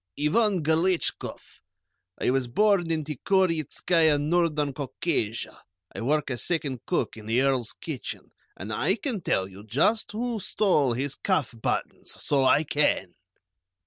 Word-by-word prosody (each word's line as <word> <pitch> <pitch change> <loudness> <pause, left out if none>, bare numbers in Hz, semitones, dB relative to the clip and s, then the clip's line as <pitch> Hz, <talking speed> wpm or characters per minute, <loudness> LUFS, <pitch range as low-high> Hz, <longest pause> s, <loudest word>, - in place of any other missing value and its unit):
"Ivan 185 +4 +2
Galetchkoff. 165 +3 0 0.6
I - - +2
was 130 -1 +1
born 195 - +2
in 160 -1 0
Tikhorietzkaia, 160 0 +1
Northern 150 -2 +1
Caucasia, 130 -4 -2 0.3
I - - -6
work 145 +3 0
as 120 -4 -2
second 145 -8 -2
cook - - -1
in 110 -1 -10
the 115 +2 +2
Earl's 130 -4 +1
kitchen, 150 -6 -6 0.3
and 105 +4 -5
I 160 - +1
can 230 -2 -3
tell 95 - 0
you 95 +1 -12
just 145 - +1
who 235 +1 -2
stole 180 - +2
his 135 +3 -2
cuff 160 -9 -1
buttons; 115 - -3
so 135 -2 +1
I 150 - +5
can!" 145 - +1
150 Hz, 140 wpm, -26 LUFS, 130-175 Hz, 0.6 s, I